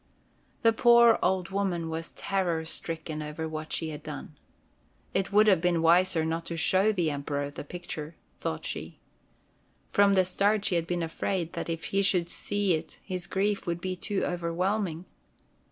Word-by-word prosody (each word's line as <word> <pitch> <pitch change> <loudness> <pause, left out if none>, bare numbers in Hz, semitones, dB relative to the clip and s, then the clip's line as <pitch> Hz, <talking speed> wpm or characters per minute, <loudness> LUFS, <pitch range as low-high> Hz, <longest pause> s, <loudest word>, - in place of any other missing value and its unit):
The 230 0 +5
poor 235 -1 +6
old 185 -1 +1
woman 190 -4 -1
was 160 0 -4
terror 175 -5 -1
stricken 160 -1 -3
over 150 +1 -4
what 155 0 -6
she 160 - -1
had 150 -1 -7
done. 150 0 -8 0.8
It 195 - 0
would 210 +1 +6
have 190 -6 +4
been 175 -2 +2
wiser 170 0 +4
not 165 +1 -2
to 170 - -4
show 190 +5 +3
the 175 -7 0
Emperor 145 0 -3
the 145 - -7
picture, 160 -1 -7 0.2
thought - - -3
she. - - -5 0.9
From 200 0 +5
the 185 -1 +4
start 200 +3 +1
she 200 - +3
had 170 -1 0
been 175 -1 -1
afraid 165 +1 -2
that - - -4
if 165 -1 -3
he 195 - +3
should 180 -3 +2
see 205 -1 0
it 160 0 -4
his 180 -2 -4
grief 200 0 -1
would 170 0 -1
be 185 +1 -3
too 195 +2 -2
overwhelming. 175 +1 -1
175 Hz, 170 wpm, -28 LUFS, 160-195 Hz, 0.9 s, poor